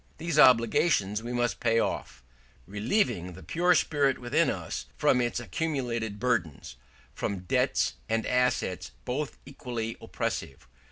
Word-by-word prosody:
These 165 -1 -1
obligations 115 - +4
we 120 +1 -6
must 120 0 0
pay 115 -1 +2
off, 65 - -2 0.4
relieving 105 - 0
the - - -12
pure 175 - +2
spirit 140 -5 +2
within 120 -1 +1
us - - -4
from 125 - +3
its 120 0 -1
accumulated 120 - -3
burdens, 95 - -1 0.4
from 95 +6 -3
debts 90 - +1 0.2
and 115 0 0
assets 110 - 0
both 140 +4 -3
equally 120 -4 -5
oppressive. 65 -1 -4
120 Hz, 125 wpm, -28 LUFS, 100-130 Hz, 0.4 s, obligations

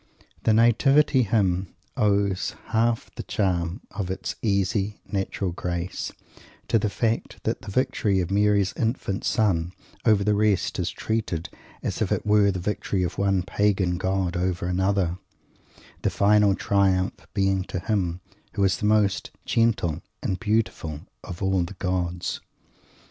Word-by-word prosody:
The 110 - +5
Nativity 130 +5 +4
Hymn 95 -5 0 0.2
owes 100 -2 +1
half 115 0 +1
the - - -6
charm 90 -3 -1
of 95 -2 -4
its 95 - -3
easy, 100 0 0
natural 95 -1 -2
grace 85 +1 -3 0.6
to 115 - +4
the 105 - 0
fact 115 +2 -2
that - - -1
the 105 - -9
victory 100 -3 +1
of 90 0 -2
Mary's 100 -1 +3
infant 110 -4 -1
son 90 -5 +1 0.3
over 105 -3 +4
the 105 +1 +2
rest 105 -3 +1
is 90 -1 0
treated 95 -4 -2 0.3
as - - -3
if - - 0
it - - 0
were 105 -1 +4
the 95 - -1
victory 95 0 -1
of 90 - -3
one 95 -2 +2
pagan 95 -2 +1
god 95 -1 0
over 90 0 -1
another 95 -1 0 0.8
the - - +1
final 105 -1 +4
triumph 95 -2 +1
being 95 -2 +2
to 95 - -4
him 90 -2 -1 0.3
who 100 - 0
is 95 -2 +3
the 105 - -1
most 105 -2 +2 0.2
"gentle" 105 -8 +1 0.2
and 95 - -1
"beautiful" 105 -9 -1 0.2
of 90 +1 -7
all 95 -1 +2
the 85 +3 -4
gods. 90 -1 -2
100 Hz, 145 wpm, -25 LUFS, 90-105 Hz, 0.8 s, The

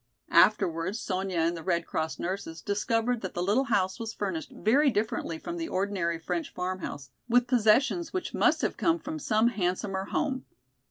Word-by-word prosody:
Afterwards 170 +5 +3
Sonya 190 -3 -2
and 165 +1 +2
the 165 - -6
Red 170 -1 0
Cross 160 0 -2
nurses 175 -3 -4
discovered 225 +3 0
that 190 - -5
the 175 - -1
little 215 +9 +2
house 195 -5 +1
was 225 -1 -5
furnished 190 -6 -3
very 275 +7 +3
differently 210 -7 -1
from 340 - -6
the 330 -1 -3
ordinary 185 -3 -1
French 290 - -3
farmhouse, 180 -7 -5 0.2
with 245 +1 +4
possessions 255 +8 +3
which 370 - -3
must - - +3
have - - 0
come 335 0 +2
from 315 -1 -6
some 220 -3 +3
handsomer 190 -2 -1
home. 260 +5 -1
200 Hz, 170 wpm, -28 LUFS, 180-245 Hz, 0.2 s, with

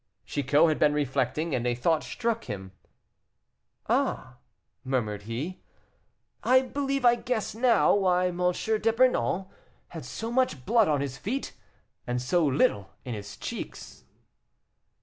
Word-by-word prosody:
Chicot 145 +3 +3
had 155 - 0
been 150 -1 +4
reflecting, 145 +3 -1
and 125 -1 0
a 120 - +1
thought 155 +6 +1
struck 235 -1 -2
him. 95 -2 -6 1.2
"Ah!" - - -1 0.5
murmured 110 -6 -1
he, 145 +11 -4 0.8
"I 260 +1 +5
believe 275 0 -2
I 240 - +7
guess 240 -2 -2
now 235 -1 +4
why 180 -2 +2
M. 175 - -6
d'Epernon 220 -1 +1 0.4
had - - -8
so 225 +1 -5
much 255 - 0
blood 230 -2 +4
on 145 -3 +1
his 135 -2 -4
feet 255 - -3 0.5
and 125 0 -1
so 170 +8 +1
little 130 -8 +2 0.2
in 125 - -4
his 105 -2 -7
cheeks." - - -7
165 Hz, 130 wpm, -27 LUFS, -, 1.2 s, I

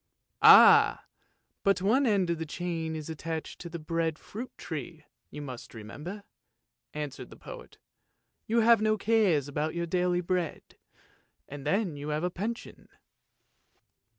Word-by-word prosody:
" - - -53
"Ah! - - +8 0.6
but 200 0 +2
one 235 +9 +2
end 195 -5 +2
of 170 - -2
the 160 - -3
chain 165 -1 -4
is 155 -2 -6
attached 160 0 -5
to 170 - -7
the 170 - -6
bread 165 0 -2
fruit 235 +10 -8
tree, 155 0 -7 0.2
you 150 - -8
must 125 -3 -9
remember," 150 - -8 0.7
answered 150 -2 -6
the - - -12
poet. - - -11 0.4
" - - -51
You 230 +1 +2
have 230 -1 +5
no 215 0 +2
cares 200 - +2
about 150 +3 -3
your 170 0 -1
daily 180 +1 0
bread, 180 -1 -3 0.7
and 145 0 -8
then 185 -2 0
you 145 +1 -6
have 150 +2 -2
a 180 - 0
pension." 225 +7 -6
170 Hz, 150 wpm, -29 LUFS, 150-200 Hz, 0.7 s, Ah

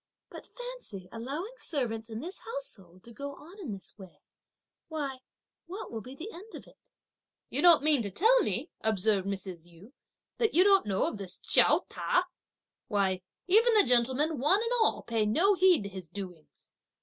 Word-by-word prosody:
But - - -10
fancy - - -8
allowing 285 - -5
servants 230 -7 -2
in 220 +1 -5
this 355 +6 -7
household 200 - -8
to 235 - -13
go 280 +4 -7
on 355 +9 -14
in 320 - -6
this 195 +1 -8
way; 190 -2 -14 0.6
why, 285 -5 -4 0.5
what 380 +5 -7
will 225 -1 -5
be 255 +4 -10
the 345 +10 -7
end 410 +5 -11
of - - -10
it?" - - -23 0.6
"You - - -1
don't 340 -5 +7
mean 300 -4 +4
to 205 - -3
tell 450 - +4
me," - - -2
observed 210 -2 +1
Mrs. 190 -4 -5
Yu, 175 +9 -17 0.5
"that 450 -7 +1
you 360 - +7
don't 390 - +4
know 195 -2 0
this 195 -3 -6
Chiao - - +4
Ta? 360 - 0 0.6
Why, 195 -5 0 0.3
even 445 +5 +5
the 420 - +7
gentlemen 260 +5 +2
one 375 - +3
and 465 - -2
all 445 - +2
pay 225 -2 0
no 345 - +3
heed 370 - +4
to 200 - -5
his 185 -4 -9
doings! 180 -5 -10
260 Hz, 175 wpm, -30 LUFS, -, 0.6 s, don't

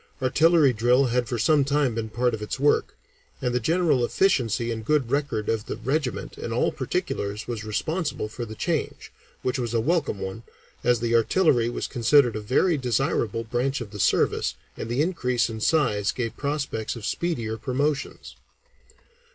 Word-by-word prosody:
Artillery 150 +2 +4
drill 120 +4 +3
had 125 -2 0
for 120 - -1
some 145 +5 +3
time 140 -2 +1
been 110 -1 -3
part 120 +2 0
of 110 - -4
its 105 - -4
work, 145 +1 +2 0.4
and 125 -1 -1
the 125 - +2
general 160 -1 +2
efficiency 120 - +1
and 110 -1 -4
good 135 -1 +1
record 140 -7 -1
of 110 -1 -1
the - - -3
regiment 130 +3 -3
in - - -5
all - - +1
particulars 100 +1 -3
was 115 -3 -4
responsible 155 - -2
for 115 +3 -6
the 110 -1 -7
change, - - -3 0.3
which 130 +1 -1
was 120 -2 -2
a - - +3
welcome 150 - 0
one, 95 +3 -5 0.4
as 120 -2 +2
the 115 -1 0
artillery 120 -1 +3
was 120 - -3
considered 125 0 +3
a 110 - -3
very 145 - +2
desirable 120 -3 0
branch 125 +4 -1
of 115 -4 -7
the 105 - -8
service, - - +2 0.2
and 110 - -6
the 125 +5 +1
increase 125 -9 0
in 110 -1 -6
size 105 -9 +2
gave 115 -2 -4
prospects 140 -7 -3
of 115 -3 -7
speedier 120 -11 -2
promotions. 135 +5 -2
125 Hz, 175 wpm, -25 LUFS, 110-140 Hz, 0.4 s, Artillery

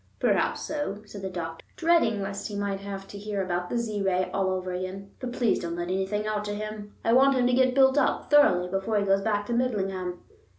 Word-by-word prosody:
"Perhaps - - +1
so," 290 -9 -3
said 205 -1 -9
the 190 - -3
doctor, 165 -3 -6
dreading 325 - +2
lest 195 0 -4
he 210 - -6
might 200 -1 -2
have 195 -1 -7
to 200 - -9
hear 205 -1 -2
about 180 -1 -2
the 240 - -1
Z 215 -3 -2
Ray 185 -1 +1
all 195 -1 +1
over 185 -1 -2
again. 190 +2 -5
"But 255 -1 -4
please 240 -3 +1
don't 170 -1 -4
let 175 0 -3
anything 190 +3 -1
out 215 -1 -1
to 205 0 -3
him; 210 0 -6
I 230 - +4
want 270 +2 +6
him 250 - +3
to 250 - +3
get 255 0 +3
built 265 +1 +5
up 275 - 0
thoroughly 185 -12 +5
before 195 +4 -1
he 200 - +1
goes 195 0 +3
back 205 0 0
to 235 - -3
Midlingham." 195 -7 -1
205 Hz, 230 wpm, -27 LUFS, 190-230 Hz, -, want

